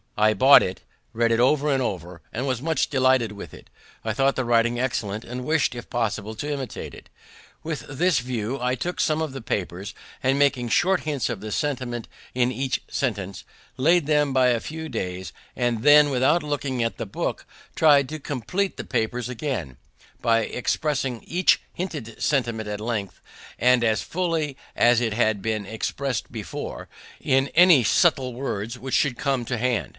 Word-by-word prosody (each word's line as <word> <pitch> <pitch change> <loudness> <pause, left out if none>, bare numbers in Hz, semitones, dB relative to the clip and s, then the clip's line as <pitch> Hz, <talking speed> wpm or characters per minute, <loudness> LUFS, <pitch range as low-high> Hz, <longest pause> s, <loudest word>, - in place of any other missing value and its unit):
I 110 0 +4
bought 135 +2 +8
it, 95 - -3 0.3
read 115 0 +2
it 115 - +2
over 145 +4 +3
and 135 -1 +1
over, 90 -6 -4
and 125 +4 -2
was 130 -3 -1
much 160 +2 0
delighted 130 -4 +3
with 100 - -9
it. - - -16 0.3
I 110 - -1
thought 135 +4 +2
the 130 - -1
writing 120 0 +2
excellent, 110 -4 -2
and 125 +1 -6
wished, 155 -4 +1
if 120 -1 -8
possible, 110 -2 -2
to 145 +7 -4
imitate 135 -3 -5
it. - - -13 0.5
With 155 -2 -4
this 155 +1 +1
view 125 +1 -3
I 125 +1 +1
took 175 +7 -4
some 155 0 +2
of 160 -3 -2
the 135 - -6
papers, 100 -2 -4 0.3
and, 135 +1 +2
making 140 -4 +2
short 185 +9 +3
hints 145 -6 -1
of 120 -4 -3
the 105 +2 -7
sentiment 125 -3 -2 0.3
in 125 0 +2
each 130 +2 -2
sentence, 100 -7 -3 0.3
laid 165 +4 +3
them 150 -1 +2
by 130 -1 +4
a 120 -2 +2
few 160 +5 -6
days, 95 -6 -4 0.2
and 120 -2 0
then, 145 +1 +7
without 135 +6 +2
looking 140 -4 -2
at 115 - -2
the - - -4
book, - - -3 0.3
try'd 145 -4 +5
to 155 0 -5
compleat 150 - -2
the - - -4
papers 120 +2 -1
again, 120 - -4 0.4
by 115 -1 +3
expressing 130 0 -2
each 180 +2 +3
hinted 150 - -6
sentiment 115 -6 0
at 105 0 -4
length, 110 -4 -4 0.4
and 125 -1 +4
as 110 -2 +1
fully 165 -5 -1 0.2
as 120 0 +4
it 115 -3 0
had 110 -3 +1
been 110 -1 -2
expressed 120 +4 -3
before, 105 -8 -6 0.3
in 135 +1 +2
any 170 -6 +6
suitable 130 - +3
words 115 -3 -4
that 130 +1 -7
should 135 -5 +2
come 135 -4 -1
to 125 0 -2
hand. 120 -1 0
125 Hz, 180 wpm, -24 LUFS, 115-145 Hz, 0.5 s, bought